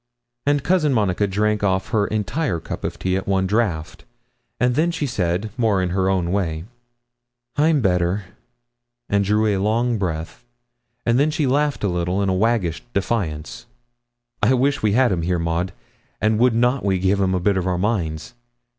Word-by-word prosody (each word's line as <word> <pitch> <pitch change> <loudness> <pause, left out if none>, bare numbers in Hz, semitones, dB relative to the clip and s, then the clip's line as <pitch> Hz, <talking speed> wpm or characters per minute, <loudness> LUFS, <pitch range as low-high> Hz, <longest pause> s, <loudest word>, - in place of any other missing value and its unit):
And 145 -1 +2
Cousin 160 -5 +2
Monica 100 -2 +1
drank 105 +2 0
off 95 -1 0
her 105 -3 +1
entire 110 - -1
cup - - -7
of - - -3
tea 95 0 -1
at 95 - -3
one 95 -1 +1
draught, 95 -6 -1 0.6
and 125 0 +2
then 155 +6 +2
she 165 -3 -2
said, 100 -4 -1
more 110 -5 +2
in 90 -1 0
her 95 0 +1
own 90 -3 0
way 80 -5 -1 0.9
'I'm 150 0 +3
better!' 90 0 +1 0.9
and 100 0 +2
drew 105 +2 +2
a 100 -3 +1
long 115 +2 +1
breath, 80 -4 -4 0.6
and 115 +2 +3
then 145 +2 +3
she 155 -1 0
laughed 145 +1 +1
a - - +2
little 90 +2 0
in 100 - +1
a - - +2
waggish 95 -5 +1
defiance. 95 -4 -2 0.7
'I 120 +5 +4
wish 135 +2 +1
we 105 -2 +2
had 125 0 +4
him 90 -3 0
here, 90 +1 0
Maud, 85 +2 -1 0.5
and 110 0 +1
would 125 -1 +4
not 125 +3 +2
we 95 -2 +1
give 95 +2 +1
him 95 -1 +1
a - - +1
bit 100 +3 +1
of 95 -1 -1
our 90 -1 0
minds! 90 -4 -2
100 Hz, 180 wpm, -21 LUFS, 90-120 Hz, 0.9 s, I